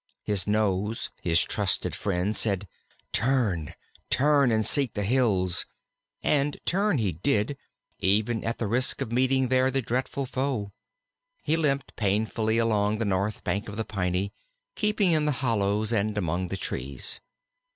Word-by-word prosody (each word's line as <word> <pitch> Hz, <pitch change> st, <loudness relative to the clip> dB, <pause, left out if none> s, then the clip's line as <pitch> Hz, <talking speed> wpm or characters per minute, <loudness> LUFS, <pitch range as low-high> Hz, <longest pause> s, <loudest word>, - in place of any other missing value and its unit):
His 100 Hz, -2 st, 0 dB
nose, 105 Hz, 0 st, 0 dB
his 85 Hz, -1 st, +3 dB
trustiest -, -, +1 dB
friend, 100 Hz, +2 st, -1 dB
said, 100 Hz, -2 st, 0 dB, 0.4 s
"Turn, 115 Hz, -, +1 dB, 0.3 s
turn 140 Hz, -2 st, +4 dB
and 110 Hz, -1 st, +2 dB
seek 140 Hz, -6 st, +1 dB
the 105 Hz, -, -1 dB
hills," 100 Hz, -6 st, +1 dB, 0.6 s
and 145 Hz, 0 st, +2 dB
turn 200 Hz, -1 st, +2 dB
he 105 Hz, -6 st, 0 dB
did 105 Hz, -, 0 dB, 0.4 s
even 110 Hz, +4 st, +1 dB
at 115 Hz, -, -2 dB
the 115 Hz, -, -2 dB
risk 125 Hz, +6 st, +2 dB
of 125 Hz, -5 st, -3 dB
meeting 130 Hz, +1 st, +2 dB
there 130 Hz, 0 st, +3 dB
the 135 Hz, 0 st, 0 dB
dreadful 130 Hz, +4 st, -2 dB
foe. 130 Hz, -5 st, -2 dB, 0.7 s
He 155 Hz, -, +2 dB
limped 140 Hz, -4 st, -1 dB
painfully 110 Hz, +2 st, 0 dB
along 110 Hz, -2 st, +1 dB
the 115 Hz, -, -1 dB
north 100 Hz, +2 st, -1 dB
bank 105 Hz, +2 st, -2 dB
of 105 Hz, -, -8 dB
the 110 Hz, -, -2 dB
Piney, 95 Hz, -1 st, -2 dB, 0.4 s
keeping 210 Hz, -, +2 dB
in 155 Hz, -2 st, +3 dB
the 150 Hz, -, +1 dB
hollows 105 Hz, -1 st, +1 dB
and 105 Hz, -1 st, 0 dB
among 90 Hz, -1 st, -1 dB
the 95 Hz, -, -4 dB
trees. 70 Hz, -6 st, -3 dB
110 Hz, 150 wpm, -27 LUFS, 100-130 Hz, 0.7 s, turn